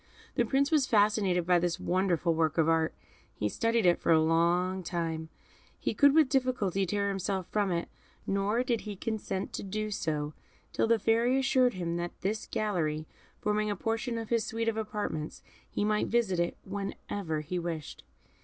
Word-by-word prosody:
The 240 - +2
Prince 275 +5 +1
was 295 -5 +3
fascinated 205 -5 +3
by 175 0 +4
this 175 0 -1
wonderful 180 -2 +1
work 160 -1 +1
of 160 -1 +4
art; 160 -1 +2 0.4
he 105 - -1
studied 230 - +1
it 175 -1 +4
for - - +1
a 160 - +6
long 170 +4 +2
time; 165 -2 -3 0.5
he - - -2
could 285 0 +5
with 315 -3 +6
difficulty 250 -8 +1
tear 200 +2 0
himself 195 -1 -2
from 205 -3 +1
it; 170 -1 -1 0.4
nor 200 +5 +1
did 240 -3 0
he 210 -2 -6
consent 205 -2 -3
to - - -3
do 215 +2 -3
so 150 -5 -2 0.4
till - - +1
the 230 0 +4
Fairy 230 +4 +2
assured 260 -3 +3
him 170 -2 -2
that 175 0 -5
this 210 +4 -2
gallery 160 -8 -1 0.4
forming 210 0 +1
a 205 - 0
portion 225 +4 -2
of 225 -1 -5
his 230 -2 +2
suite 225 +1 -3
of 225 - +1
apartments, 210 -8 -4 0.3
he 205 - -1
might 210 0 +1
visit 220 -7 +1
it 175 - 0
whenever 195 -4 -4
he 175 +4 -3
wished. 165 -3 -5
195 Hz, 180 wpm, -30 LUFS, 170-225 Hz, 0.5 s, a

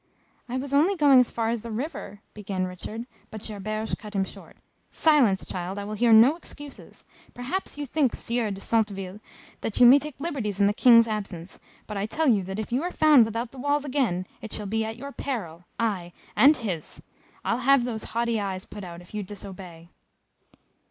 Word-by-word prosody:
"I 250 - -2
was 275 +1 -4
only 325 +8 +4
going 285 -6 +6
as 250 - +3
far 225 -1 -1
as 235 -2 -2
the 235 - -8
river 225 -3 -5
" - - -43
began 195 -3 -3
Richard, 210 +5 -7 0.2
but 215 -1 -9
Gerberge 215 +1 -3
cut 210 -1 -10
him 195 - +2
short. - - -11 0.3
"Silence, 270 -12 +3
child 185 +2 -5
I 205 - -4
will 210 +1 -5
hear 230 +2 +2
no 230 +7 +7
excuses. 290 -4 -11 0.3
Perhaps 270 +8 -4
you 295 - -3
think, 275 -2 +1
Sieur 235 -2 -2
de 195 -1 -5
Centeville, 200 -4 -1 0.4
that 220 - -3
you 245 - +8
may 260 +4 +9
take 295 -2 -8
liberties 255 - -3
in 200 - +5
the 205 - +3
King's 230 0 +6
absence, 195 -5 -5 0.3
but 210 - -6
I 200 +1 -1
tell 315 +7 0
you 220 -6 +4
that 190 +1 -5
if 220 +1 -5
you 250 +3 +1
are 355 +2 -2
found 300 -9 +6
without 230 +2 -4
the 270 - -12
walls 290 +2 0
again, 250 -11 0 0.2
it 220 - -8
shall 210 - -4
be 220 +3 -1
at 220 +1 -5
your 280 +3 -7
peril; 180 - -5
ay, 190 -7 -1 0.2
and 295 +3 +6
his! 190 -10 -5 0.5
I'll 235 - +1
have 270 0 +4
those 225 -3 -4
haughty 235 -1 -1
eyes 190 -2 -4
put 205 -1 -9
out, 170 -1 -8
if 175 - -18
you 210 - -2
disobey!" 185 -4 -10
225 Hz, 205 wpm, -26 LUFS, 200-260 Hz, 0.5 s, may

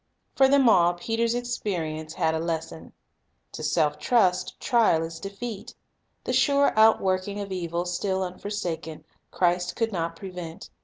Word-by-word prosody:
For 270 - +6
them 275 -1 +4
all, 175 -5 +5
Peter's 230 +5 -1
experience 170 -10 -3
had 160 - +1
a 160 - -1
lesson. 160 - -4 0.6
To - - -8
self 150 -1 +1
trust, 185 -4 +1
trial 225 -9 +3
is 165 0 -6
defeat. 200 +2 -7 0.5
The - - -2
sure 280 -1 +3
outworking 200 -2 +3
of 200 -1 -6
evil 175 -1 -2
still 190 +2 -1
unforsaken, 180 -4 -5 0.3
Christ 180 0 0
could 225 -1 -1
not 165 -3 -3
prevent. 180 -3 -8
185 Hz, 140 wpm, -26 LUFS, 165-220 Hz, 0.6 s, For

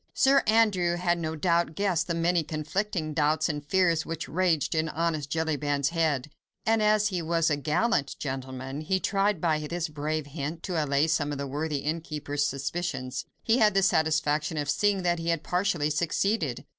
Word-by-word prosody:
Sir 275 0 +5
Andrew 205 -6 +3
had 175 0 0
no 160 -1 -3
doubt 170 0 +1
guessed 185 -5 0
the 170 - -1
many 170 +1 +2
conflicting 155 +2 -3
doubts 155 0 +2
and 150 -3 -3
fears 170 0 +2
which 165 -1 -5
raged 175 -3 +1
in 160 0 0
honest 155 -2 -1
Jellyband's 145 -3 0
head; 155 -4 0 0.3
and, 225 0 +3
as 210 0 +3
he 180 -3 -2
was 165 0 +1
a - - +3
gallant 150 +2 0
gentleman, 130 0 -5
he 190 +5 0
tried 200 -1 +1
by 155 -2 +1
this 165 +2 -3
brave 150 +1 -3
hint 150 +3 -5
to 170 -5 -1
allay 140 +1 +2
some 155 -2 0
of 145 - -3
the 140 - -3
worthy 145 +1 -2
innkeeper's 150 -2 -2
suspicions. 140 -1 -3 0.2
He 230 +2 +3
had 210 -3 +4
the 195 - +4
satisfaction 155 -3 +1
of 145 -1 0
seeing 205 -2 +1
that 175 -1 +1
he 165 0 -2
had 165 -2 0
partially 180 -5 0
succeeded. 165 - 0
160 Hz, 180 wpm, -27 LUFS, 150-180 Hz, 0.3 s, Sir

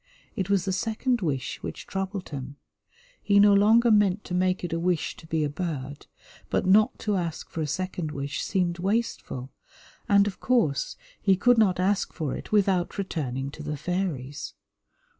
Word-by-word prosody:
It 190 -1 -2
was 195 -3 +2
the 190 - 0
second 225 +5 0
wish 135 -6 -2
which - - -6
troubled 195 0 -4
him. 140 -1 -6 0.7
He 200 -1 +4
no 205 0 +7
longer 225 +4 +5
meant 205 -1 +3
to - - -7
make 185 +1 +1
it 175 - -3
a 165 - 0
wish 175 -2 0
to 160 - -13
be 160 -1 0
a - - +1
bird, 145 -3 -5 0.4
but - - 0
not 210 +3 +4
to 210 -2 0
ask 170 -3 -4
for 165 - -3
a 155 - -1
second 180 0 -3
wish 140 -1 -4
seemed 180 -3 0
wasteful, 190 - -2 0.6
and, 200 -1 +6
of 205 -2 -4
course, 205 - +1 0.3
he 195 -2 +4
could 245 +4 +4
not 185 -5 +3
ask 195 +2 +1
for 155 -6 -3
it - - -9
without 195 -4 +2
returning 140 -8 -3
to 155 - -10
the 150 0 -4
fairies. 150 -6 -3
185 Hz, 180 wpm, -26 LUFS, 155-200 Hz, 0.7 s, no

